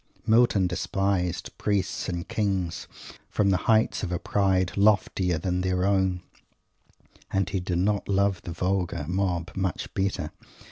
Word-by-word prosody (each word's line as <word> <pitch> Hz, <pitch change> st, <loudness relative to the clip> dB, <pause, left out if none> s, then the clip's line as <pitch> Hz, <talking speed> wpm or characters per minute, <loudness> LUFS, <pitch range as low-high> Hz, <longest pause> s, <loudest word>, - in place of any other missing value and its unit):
Milton 110 Hz, -4 st, +4 dB
despised 90 Hz, 0 st, -1 dB
"priests 100 Hz, -2 st, -1 dB
and 85 Hz, -1 st, -4 dB
kings" 95 Hz, -5 st, -1 dB, 0.4 s
from 100 Hz, -2 st, +2 dB
the 95 Hz, -, +3 dB
heights 110 Hz, 0 st, +3 dB
of 90 Hz, -, -3 dB
a 90 Hz, -, 0 dB
pride 95 Hz, 0 st, +1 dB
loftier 100 Hz, -4 st, +2 dB
than 90 Hz, +3 st, -1 dB
their 90 Hz, 0 st, 0 dB
own 95 Hz, -2 st, +1 dB, 1.1 s
and 95 Hz, -1 st, 0 dB
he 95 Hz, 0 st, -1 dB
did 90 Hz, -1 st, -2 dB
not 100 Hz, +3 st, 0 dB
love 100 Hz, -2 st, +2 dB
the 85 Hz, -, -7 dB
vulgar 90 Hz, -3 st, -1 dB
mob 90 Hz, -1 st, -1 dB
much 95 Hz, -3 st, -2 dB
better. 95 Hz, -5 st, -1 dB
95 Hz, 140 wpm, -26 LUFS, 90-100 Hz, 1.1 s, Milton